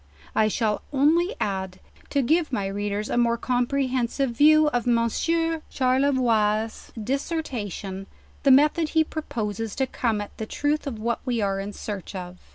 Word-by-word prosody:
I 215 - +3
shall 215 -1 0
only 325 - +3
add, 190 -2 -3 0.3
to 280 -1 +1
give 315 +4 +2
my 205 -6 -1
readers 205 +1 -2
a - - -1
more 235 -1 +3
comprehensive 255 +1 0
view 310 +5 +6
of 245 -3 -1
Monsieur 325 +8 +1
Charle 265 +2 +2
voix's 220 -4 +1
dissertation, 220 - -3 0.3
the 280 - +3
methed 300 +4 +5
he 320 - +6
proposes 225 - -4
to 265 - +1
come 230 -4 -1
at 205 - -7
the 220 - -4
trath 290 +3 -1
of 245 -5 -4
what 230 +2 -1
we 245 -3 -1
are 195 -2 0
in 200 +1 -4
search 205 -2 -6
of. 180 -1 -7
240 Hz, 160 wpm, -25 LUFS, 210-280 Hz, 0.3 s, view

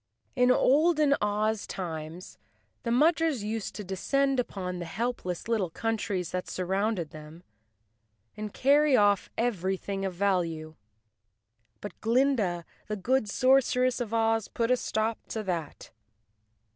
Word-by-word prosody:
In 250 -1 +4
olden 300 +3 +4
Oz 210 +1 0
times 165 -1 -6 0.4
the 235 - -4
Mudgers 310 0 +3
used 215 0 -4
to 210 - -5
descend 270 +8 0
upon 180 -6 -3
the 175 - -4
helpless 195 -2 -3
little 215 -6 0
countries 205 -2 -2
that 180 0 -3
surrounded 190 -2 -1
them 155 +2 -11 0.9
and 215 -1 -5
carry 285 +2 +4
off 205 -2 +3
everything 195 -3 -1
of 190 -2 -3
value. 170 -5 0 1.1
But 205 - -9
Glinda, 225 -8 +1 0.2
the 215 - -2
good 220 +3 0
sorceress 255 +1 +3
of 235 - -3
Ozj 225 -1 0
put 230 +1 +1
a - - +6
stop 220 -1 -1
to 220 - -4
that. 170 -6 -4
215 Hz, 125 wpm, -28 LUFS, 185-250 Hz, 1.1 s, a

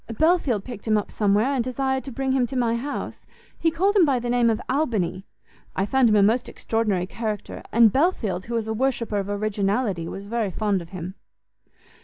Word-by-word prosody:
Belfield 315 - +2
picked 240 -4 -9
him 215 -1 +4
up 210 - -3
somewhere, 210 +6 +2
and 255 -4 +1
desired 265 +1 -1
to 270 - -6
bring 265 +2 -1
him 260 -2 +2
to 265 - -7
my 235 -2 +1
house: 275 +5 -5 0.4
he 330 - +3
called 380 +6 +1
him 390 - +6
by 280 -5 +3
the 240 0 -2
name 240 -1 +3
of 220 0 +1
Albany: 220 - -1 0.5
I 190 - +1
found 255 +2 +3
him 215 - +3
a 205 - +5
most 230 +5 +2
extraordinary 210 -5 -1
character, 215 +1 -5
and 230 -2 +5
Belfield, 235 - +1
who 235 - -4
is 225 - -2
a 220 - -1
worshipper 230 -3 0
of 200 0 -4
originality, 205 -2 -1
was 195 +3 -7
very 225 -1 -1
fond 200 0 0
of 170 - -11
him." 185 0 -6
230 Hz, 205 wpm, -24 LUFS, 205-260 Hz, 0.5 s, him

